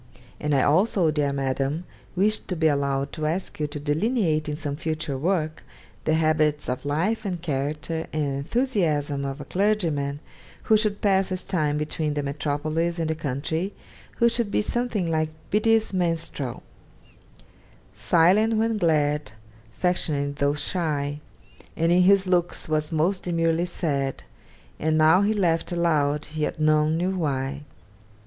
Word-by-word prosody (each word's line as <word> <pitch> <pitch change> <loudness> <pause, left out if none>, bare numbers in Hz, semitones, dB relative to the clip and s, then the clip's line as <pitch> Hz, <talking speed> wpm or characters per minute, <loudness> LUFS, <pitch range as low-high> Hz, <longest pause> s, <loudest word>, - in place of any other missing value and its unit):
And 150 -1 0
I 135 - +3
also, 180 +1 +3
dear 145 -2 0
Madam, 140 +3 -1 0.3
wished 210 +4 +1
to 180 - -2
be 160 -1 0
allowed 140 -2 +1
to 155 -2 -2
ask 170 +2 -3
you 150 - 0
to 145 0 -6
delineate 155 - 0
in 150 - -2
some 145 -2 -4
future 155 -2 -3
work 160 +1 -1 0.4
the 155 - +3
habits 155 -2 +2
of 125 +2 -3
life, 180 +10 0
and 185 -4 -3
character, 150 +1 -3
and 145 -3 -1
enthusiasm 155 - 0
of 135 +1 -4
a 145 - -7
clergyman, 165 -8 0 0.4
who 220 - +4
should 210 -1 +1
pass 195 -2 +2
his 185 -1 -3
time 150 -4 0
between 150 0 -2
the 145 - -1
metropolis 155 +4 -1
and 160 -1 -1
the - - +1
country, 160 +6 -3 0.4
who 235 - +4
should 235 -2 0
be 210 - +1
something 235 -4 -1
like 155 -1 0 0.2
Beattie's 220 +1 +2
Minstrel 165 -8 -2 1.3
Silent 180 - +3
when 225 0 +1
glad, 150 - +1 0.4
affectionate 145 -6 0
tho' 140 +1 +1
shy, 145 -2 -2 0.6
And 165 +1 +2
in 180 +1 +5
his 195 +1 +5
looks 175 -2 0
was 155 0 0
most 170 +5 +1
demurely 165 0 +1
sad; 140 -6 -2 0.6
And 155 0 +1
now 160 +4 +5
he 205 +1 +2
laughed 175 -7 +1
aloud, 155 -4 +1
yet 155 0 -2
none 155 +1 +3
knew 185 +3 0
why. 140 -3 -2
155 Hz, 150 wpm, -25 LUFS, 145-180 Hz, 1.3 s, in